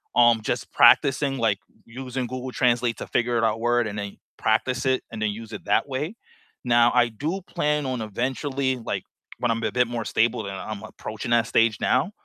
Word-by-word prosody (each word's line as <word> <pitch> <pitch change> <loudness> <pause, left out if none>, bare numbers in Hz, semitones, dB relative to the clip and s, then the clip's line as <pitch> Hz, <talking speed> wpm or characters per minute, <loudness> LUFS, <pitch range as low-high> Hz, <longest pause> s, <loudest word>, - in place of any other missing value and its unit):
um, 120 -2 +5
just - - -3
practicing, 135 0 +5
like, 110 -5 +1 0.3
using 125 +1 -5
Google 130 +1 -5
Translate 120 -2 +1
to - - -6
figure 120 -1 +1
out 110 - +2
a - - -9
word, 120 +1 +1
and 105 - -5
then 100 -1 -6 0.2
practice 125 +5 0
it, 130 0 +1
and 110 - -6
then 110 - +1
use 110 +1 -9
it - - -8
that - - +2
way. 145 +9 -3 0.5
Now, 120 -1 +5
I 120 -1 +4
do 155 - -3
plan 150 -5 -1
on 130 -3 -2
eventually, 130 +4 -2
like, 115 - -4 0.3
when 120 - 0
I'm 115 - -1
a - - 0
bit 125 -1 +2
more 120 -1 -3
stable, 110 -1 0
and 100 - -5
I'm 100 +2 -6
approaching 110 +2 -7
that 120 -1 +4
stage 115 -2 +2
now, 190 - +1
120 Hz, 200 wpm, -24 LUFS, 110-130 Hz, 0.5 s, um